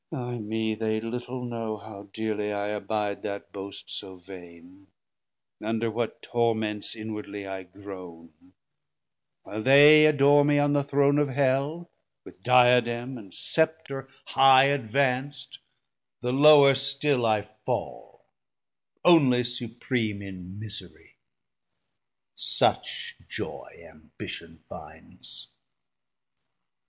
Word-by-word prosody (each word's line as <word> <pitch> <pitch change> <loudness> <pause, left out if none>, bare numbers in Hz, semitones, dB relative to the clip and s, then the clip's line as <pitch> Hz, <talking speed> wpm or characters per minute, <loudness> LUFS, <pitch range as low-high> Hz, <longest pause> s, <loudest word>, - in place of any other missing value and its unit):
Ay 120 -1 -5
me, 110 +1 -2
they 110 0 -2
little 125 +2 -5
know 115 -2 -4
How 100 -1 -12
dearly 105 -1 -3
I 100 0 -3
abide 105 0 -3
that 100 -1 -6
boast 100 0 -9
so 95 -1 -5
vaine, 90 0 -14 0.8
Under 115 +1 -1
what 115 +1 -4
torments 110 -3 -1
inwardly 105 -2 -7
I 95 0 -6
groane; 90 -3 -13 0.9
While 110 - -6
they 145 +5 +8
adore 145 -1 +5
me 145 0 +2
on 145 0 +2
the 145 -1 +2
Throne 140 +1 +2
of 145 -1 +1
Hell, 140 +5 -1 0.3
With - - -15
Diadem 125 +1 +3
and 100 -4 -14
Scepter 160 - -2 0.2
high 135 0 +6
advanc'd 135 +1 -1
90 - - -41 0.6
The 125 +1 -2
lower 140 0 +7
still 135 0 0
I 110 -2 +1
fall, 110 0 -6 0.8
onely 135 -8 +5
Supream 120 -3 -3
In 95 -1 -9
miserie; 105 -6 -10 1.2
such - - -1
joy - - -8
Ambition 80 +1 -10
findes. - - -10
115 Hz, 105 wpm, -26 LUFS, 100-135 Hz, 1.2 s, they